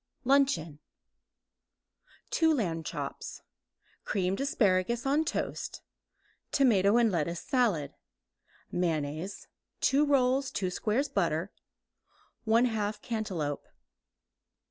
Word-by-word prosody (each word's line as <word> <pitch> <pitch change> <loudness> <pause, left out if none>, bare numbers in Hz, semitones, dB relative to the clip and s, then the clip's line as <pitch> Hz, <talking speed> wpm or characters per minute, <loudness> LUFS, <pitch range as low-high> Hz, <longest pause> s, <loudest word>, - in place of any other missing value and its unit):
LUNCHEON 265 - +2 1.6
Lamb 225 - +2
chops - - -5
(2); - - -25 0.6
creamed 190 +2 -1
asparagus 235 -3 +1
on 285 +3 +3
toast; - - -4 0.7
tomato 215 -6 +4
and 235 -2 +4
lettuce 170 0 -1
salad, 220 - +1 0.8
mayonnaise; 165 +1 -2 0.3
2 280 +2 +4
rolls; 270 -2 +2
2 185 -2 -2
squares 230 +9 0
butter; 175 - -1 1.0
1/2 220 -2 +2
cantaloupe. 190 - -3
210 Hz, 80 wpm, -30 LUFS, 175-260 Hz, 1.6 s, tomato